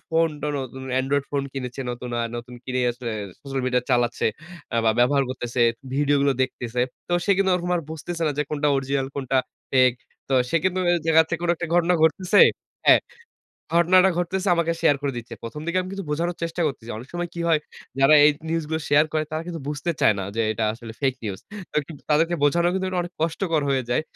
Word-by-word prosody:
Phone 165 0 +3
tone 150 - -1
নতুন 130 +1 -8 0.2
Android 140 +1 0
phone 140 -1 0
কিনেছে 130 -1 -5
নতুন 125 0 -6
আ - - 0
নতুন 120 +1 -8
কিনে 130 0 -1
আসলে 120 -1 -6 0.3
সোশ্যাল 135 -1 -4
মিডিয়া 125 -1 +1
চালাচ্ছে 120 -1 +2 0.5
আ - - +2
বা 110 - +5
ব্যবহার 135 +3 +4
করতেছে, 120 -1 -3 0.3
ভিডিওগুলো 140 0 +3
দেখতেছে। 125 -2 -3 0.3
তো - - -3
সে - - 0
কিন্তু 195 0 +2
ওরকম 180 0 -2
আর 170 - -3
বুঝতেছে 165 +2 -5
না - - +2
যে, - - +3
কোনটা 150 -1 +1
অরিজিনাল 135 0 -1
কোনটা 135 -1 -1 0.4
ফেক। 130 -2 +5 0.4
তো 135 - +1 0.2
সে 165 - +2
কিন্তু 185 0 +1 0.3
দেখাচ্ছে 160 0 +4
থেকে 170 - -1
কোন 175 - +1
একটা 175 - -4
ঘটনা 175 +1 +3
ঘটতেছে, 185 +5 +4 0.5
হ্যাঁ। - - +8 0.8
ঘটনাটা 185 +2 +5
ঘটতেছে 185 +3 -1
আমাকে 170 -1 +1
শেয়ার 150 -4 +4
করে 140 -1 -1
দিচ্ছে। 120 0 -7
১ম 115 +6 -6
দিকে 170 +2 0
আমি 185 - -5
কিন্তু 195 -1 -5
বোঝানোর 170 +4 -1
চেষ্টা 165 +1 -3
করতেছি। 125 -5 -5
অনেক 120 +5 -9
সময় 175 0 -3
কি 170 - -5
হয় 160 -2 +3 0.4
যারা 135 +3 +6
এই 150 - +7 0.2
নিউজ 165 0 -1
গুলো 160 0 -1
শেয়ার 145 +1 +5
করে 155 -1 0
তারা 155 +1 -3
কিন্তু 170 -2 -5
বুঝতে 150 +3 -2
চায় 105 - +5
না 95 - -2
যে, - - +1
এটা 110 +1 -1
আসলে 115 0 -9
ফেক 135 -3 +1
নিউজ। 100 -3 -4 0.3
তো - - -4 0.3
তাদেরকে 165 +3 +3
বোঝানো 170 +4 +3
কিন্তু 190 0 -1 0.2
অনেক 175 0 -8
কষ্টকর 165 -1 0
হয়ে 135 -1 +1
যায়, 120 - +2
150 Hz, 205 wpm, -24 LUFS, 130-170 Hz, 0.8 s, হ্যাঁ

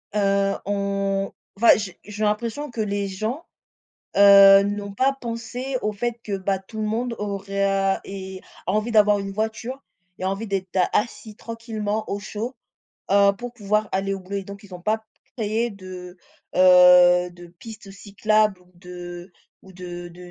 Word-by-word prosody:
heu, 195 -1 +2
on 195 -1 -1 0.3
enfin 230 +3 +6
j 200 -4 -5
j'ai 210 +1 -5
l'impression 235 +7 -1
que 230 -2 -3
les 200 -1 -1
gens, 220 - -4 0.7
heu, 200 0 +9
n'ont 205 0 -4
pas 265 +6 +2
pensé 240 +3 -4
au 210 - -1
fait 240 +3 -3
que 200 -2 -3
bah 190 0 -1
tout 215 +3 -10
le 215 - -1
monde 230 +2 -2
aurait 200 -1 -3
à 195 0 +1
et 190 -1 -7 0.3
a - - +1
envie 215 +3 0
d'avoir 210 -2 +4
une 195 0 -5
voiture 225 +5 -4 0.4
et 185 - -3
envie 195 +4 -2
d'être 190 -1 -3 0.2
assis 215 -1 -2
tranquillement 220 -2 -4
au 200 - -2
chaud, 220 +5 -5 0.6
heu, 200 0 +6
pour 245 0 -6
pouvoir 210 -2 -1
aller 195 +1 0
au 195 - -6
boulot 190 +2 -6
et 195 - -6
donc 200 +2 -10
ils 195 -2 -12
ont 180 - -9
pas 220 +3 -1 0.3
créé 225 +1 -1
de 185 -2 -10 0.4
heu, 180 -1 +7
de 175 0 -12
pistes 215 -2 -11
cyclables 210 0 0
ou 180 0 -24
de 175 0 -10 0.3
ou 190 - -15
de 175 -1 -8
de 175 +1 -13
200 Hz, 170 wpm, -23 LUFS, 190-220 Hz, 0.7 s, heu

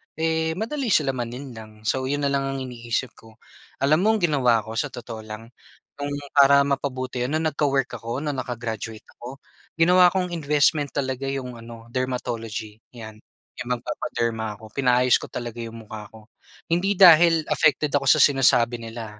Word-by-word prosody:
eh, 160 0 0
madali 240 - -3
silang 140 - +2
malinlang. 115 -3 -8
So 130 +4 -1
yun 145 +1 -2
na 140 - +1
lang 135 -1 0
ang 135 0 -3
iniisip 120 0 -4
ko. 110 0 -17 0.5
Alam 150 +3 +4
mo 195 - +1
ang - - -1
ginawa 125 -8 +2
ko, 110 - -9
sa 145 - 0
totoo 120 -3 -8
lang 110 +2 -10 0.5
nung 145 0 -3 0.2
para 140 0 +6
mapabuti, 130 -2 -3
yun 135 +5 -2
nung 160 0 0
nagka-work 140 -2 0
ako, 115 +5 -5
nung 145 -2 -2
naka-graduate 115 -3 -5 0.2
ako. 130 +3 -9 0.4
Ginawa 180 +2 +5
kong 180 -1 -2
investment 150 -2 +1
talaga 130 -1 -2
yung 130 -2 -4
ano 115 0 -12
dermatology, 115 -4 -4 0.2
yan, 110 -2 -10 0.4
yung 120 - -6
magpapaderma 115 -6 -3
ako. 110 -1 -13
Pinaayos 125 -1 +3
ko - - -8
talaga 120 -1 -7
yung 115 -1 -7
mukha 105 0 -9
ko. 110 -1 -16 0.4
Hindi 190 +4 +1
dahil 170 -3 +7
affected 150 -1 +2
ako 135 -1 0
sa - - +6
sinasabi 120 -3 +4
nila 115 -2 -8
130 Hz, 165 wpm, -23 LUFS, 115-145 Hz, 0.5 s, dahil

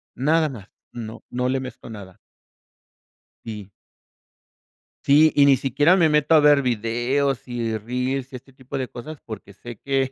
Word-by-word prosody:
Nada 155 +5 +2
más, 110 -7 -11 0.2
no 110 -2 -8
no 125 +1 -1
le 135 +1 0
mezclo 130 -2 -9
nada. 100 -5 -11 1.3
Sí. 105 -3 -8 1.3
Sí, 155 +3 +5
y 145 - +6
ni 140 -1 +6
siquiera 145 +7 +3
me 170 -4 +3
meto 150 +1 +3
a - - +7
ver 145 -1 +5
videos 125 +3 -1
y 115 -2 -2
reels 125 +4 -3
y - - -6
este 125 +2 -12
tipo 130 +1 -7
de 130 -1 -3
cosas, 145 +5 -9
porque, 105 -3 -10
sé 120 +3 -10
que 135 +2 -1
130 Hz, 160 wpm, -22 LUFS, 115-140 Hz, 1.3 s, a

